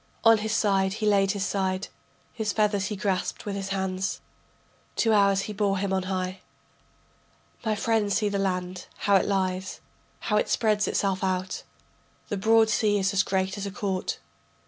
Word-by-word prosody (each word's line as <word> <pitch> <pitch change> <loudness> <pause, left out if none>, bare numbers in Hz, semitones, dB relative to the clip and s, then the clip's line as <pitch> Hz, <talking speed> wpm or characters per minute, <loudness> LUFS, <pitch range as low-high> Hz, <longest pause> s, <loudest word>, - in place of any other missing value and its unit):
On 225 -1 +6
his 215 +1 -2
side 195 -3 +2
he 215 - -3
laid 195 -2 +3
his 200 -1 -2
side, 190 0 -1 0.5
His 220 -3 -1
feathers 210 -3 +1
he 210 - -3
grasped 190 -2 -2
with 205 -1 -3
his 195 -1 -4
hands. 190 0 -2 0.8
Two 225 -1 +2
hours 200 -2 +4
he 210 - -5
bore 200 -1 +1
him 195 0 -1
on 190 - +1
high. 185 0 -2 1.2
My 220 -2 0
friend 210 0 +1
see 210 +2 +2
the 200 -1 -1
land, 180 -1 -2 0.2
how 200 -1 +5
it - - 0
lies, 190 -1 -1 0.4
How 210 - +1
it - - +1
spreads 215 -2 +2
itself 195 -2 0
out. 185 0 -1 0.7
The 205 - -1
broad 220 +2 +4
sea 210 -1 +2
is 195 0 +1
as 195 - +4
great 190 0 -1
as 200 - -3
a - - -5
court. 195 -3 -2
200 Hz, 175 wpm, -26 LUFS, 190-210 Hz, 1.2 s, On